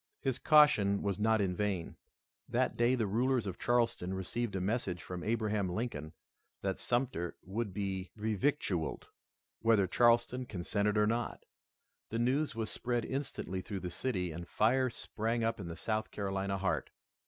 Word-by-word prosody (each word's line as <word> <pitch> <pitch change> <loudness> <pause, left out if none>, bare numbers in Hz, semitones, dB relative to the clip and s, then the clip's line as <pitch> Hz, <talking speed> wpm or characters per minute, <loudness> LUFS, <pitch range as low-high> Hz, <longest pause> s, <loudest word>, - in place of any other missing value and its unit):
His 135 -3 -1
caution 110 -10 +5
was 100 -1 -1
not 110 0 +3
in 90 -2 0
vain. 95 -4 -1 0.5
That - - +1
day 120 +2 +3
the 115 -3 0
rulers 120 +4 +1
of 95 -3 -5
Charleston 115 -6 +1
received 100 +4 -2
a - - 0
message 95 -3 -1
from 90 -1 -6
Abraham 110 -3 0
Lincoln 90 -7 -3 0.5
that 95 -1 -1
Sumter 120 -9 -1
would 105 +3 -3
be 95 -1 -3
revictualled, 105 - 0 0.6
whether 110 -4 +4
Charleston 120 +5 +3
consented 100 +2 0
or 105 - +5
not. 115 +3 -1 0.6
The 115 - -2
news 130 +3 +1
was 110 -1 -2
spread 120 -1 -1
instantly 130 -9 -3
through 100 -1 -5
the 90 -1 -4
city 90 -6 -1
and 85 +2 -7
fire 130 +4 +3
sprang 115 0 -2
up 115 0 0
in 95 - -5
the 85 -1 -6
South 110 +3 -1
Carolina 95 -1 -2
heart. 95 -1 -1
105 Hz, 155 wpm, -33 LUFS, 95-120 Hz, 0.6 s, caution